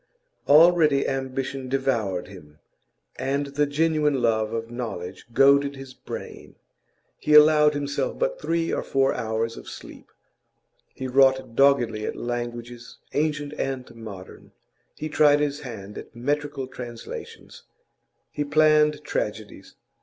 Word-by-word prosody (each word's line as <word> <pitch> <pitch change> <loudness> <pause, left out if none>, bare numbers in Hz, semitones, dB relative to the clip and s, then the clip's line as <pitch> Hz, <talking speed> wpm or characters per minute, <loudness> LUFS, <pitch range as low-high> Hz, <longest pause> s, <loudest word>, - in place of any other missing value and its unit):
Already 155 -2 +5
ambition 135 0 -3
devoured 120 -9 -1
him, 75 -6 -14 0.6
and 135 +2 -1
the 145 +1 +1
genuine 150 -1 +1
love 110 -2 +1
of 115 0 -4
knowledge 95 -7 -6
goaded 140 +3 +4
his 135 -1 -10
brain. - - -9 0.6
He 150 - +2
allowed 150 0 +7
himself 145 0 -2
but - - -1
three 165 0 -1
or - - 0
four 135 0 +1
hours 115 +1 -2
of - - -10
sleep; - - -11 0.9
he 130 - -5
wrought 130 -2 +3
doggedly 125 -6 +3
at - - -4
languages, 120 0 -6 0.2
ancient 150 -1 -1
and 130 -3 -4
modern; 105 -5 -11 0.4
he 155 - -5
tried 145 -1 +4
his 145 -1 -1
hand 105 -7 -8
at - - -13
metrical 145 +2 -2
translations; 120 -2 -9 0.7
he 145 - -2
planned 150 0 +3
tragedies. 105 0 -5
135 Hz, 125 wpm, -24 LUFS, 115-145 Hz, 0.9 s, allowed